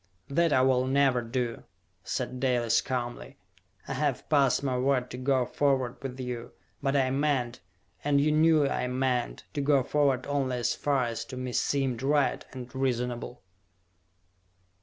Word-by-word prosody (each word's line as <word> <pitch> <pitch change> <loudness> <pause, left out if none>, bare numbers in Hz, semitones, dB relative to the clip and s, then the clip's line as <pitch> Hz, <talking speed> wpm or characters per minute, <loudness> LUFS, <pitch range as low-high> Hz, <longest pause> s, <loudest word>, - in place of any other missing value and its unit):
"That 165 +3 +2
I 130 - +4
will 130 -1 +3
never 135 -2 +3
do!" 120 0 -3 0.4
said 125 - -3
Dalis 120 -3 +2
calmly. 120 - -4 0.5
"I - - -3
have - - -1
passed 140 -3 +3
my 130 -2 0
word 125 0 +1
to 125 - -6
go 130 -1 +2
forward 130 -2 0
with 130 -1 -6
you; 125 -2 -5 0.3
but 135 0 0
I 130 -2 +2
meant, 135 -4 0 0.4
and 145 -1 +3
you 150 +2 +3
knew 155 -1 +4
I 125 - -1
meant, 125 -1 -1
to 145 - -1
go 140 -2 +3
forward 135 -2 +1
only 135 -3 -1
as 120 - 0
far 140 -3 0
as 115 -1 -3
to 130 +2 -8
me 125 -1 -4
seemed 135 -4 0
right 140 0 +1
and 125 -2 -9
reasonable!" 125 -2 -2
130 Hz, 160 wpm, -28 LUFS, 125-140 Hz, 0.5 s, I